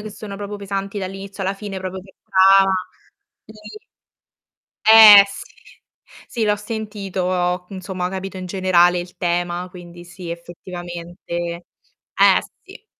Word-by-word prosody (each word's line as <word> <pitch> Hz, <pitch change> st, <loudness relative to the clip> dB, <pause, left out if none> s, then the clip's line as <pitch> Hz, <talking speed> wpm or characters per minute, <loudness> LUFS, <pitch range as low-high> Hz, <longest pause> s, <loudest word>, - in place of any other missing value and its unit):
che 215 Hz, -, -7 dB
sono 205 Hz, -1 st, -9 dB
proprio 205 Hz, +1 st, -6 dB
pesanti 200 Hz, 0 st, -5 dB
dall'inizio 195 Hz, +1 st, -7 dB
alla 190 Hz, +1 st, -1 dB
fine 195 Hz, -1 st, -7 dB
proprio 185 Hz, 0 st, -6 dB
che 190 Hz, +1 st, -18 dB
ca 195 Hz, +1 st, +5 dB, 0.8 s
ti -, -, -14 dB, 1.3 s
eh, 220 Hz, -2 st, +10 dB
sì, 200 Hz, -, -12 dB, 0.7 s
sì 235 Hz, -, -3 dB
l'ho 210 Hz, 0 st, +2 dB
sentito, 190 Hz, -4 st, -3 dB
insomma, 185 Hz, -1 st, -5 dB
ho -, -, -6 dB
capito 190 Hz, 0 st, -6 dB
in 185 Hz, -, -6 dB
generale 180 Hz, -1 st, +2 dB
il 175 Hz, 0 st, -9 dB
tema, 175 Hz, 0 st, -2 dB
quindi 175 Hz, -1 st, -13 dB
sì, 175 Hz, 0 st, -10 dB
effettivamente. 175 Hz, 0 st, -9 dB, 0.9 s
Eh, -, -, +5 dB, 0.2 s
sì. -, -, -15 dB
190 Hz, 130 wpm, -20 LUFS, 180-200 Hz, 1.3 s, eh